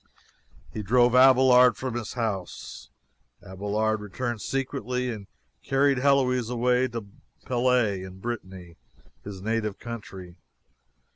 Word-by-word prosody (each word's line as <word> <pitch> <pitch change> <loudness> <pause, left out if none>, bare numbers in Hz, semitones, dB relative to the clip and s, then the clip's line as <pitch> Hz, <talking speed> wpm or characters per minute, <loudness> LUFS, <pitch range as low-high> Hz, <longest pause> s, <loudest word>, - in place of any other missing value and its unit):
He 110 - -4
drove 120 +4 +3
Abelard 125 -2 +6
from 130 -2 -4
his 120 -3 -5
house. 105 -7 -5 0.6
Abelard 105 +3 -1
returned 115 +2 -4
secretly 125 -1 -2
and 105 -4 -8 0.3
carried 135 -1 +2
Heloise 125 -3 +2
away 125 +1 +1
to 115 -3 -6 0.4
Palais, 120 -6 +1
in 95 0 -9
Brittany, 95 -6 -7 0.5
his 95 -2 -8
native 110 -2 -2
country. 95 -6 -9
115 Hz, 110 wpm, -26 LUFS, 105-125 Hz, 0.6 s, Abelard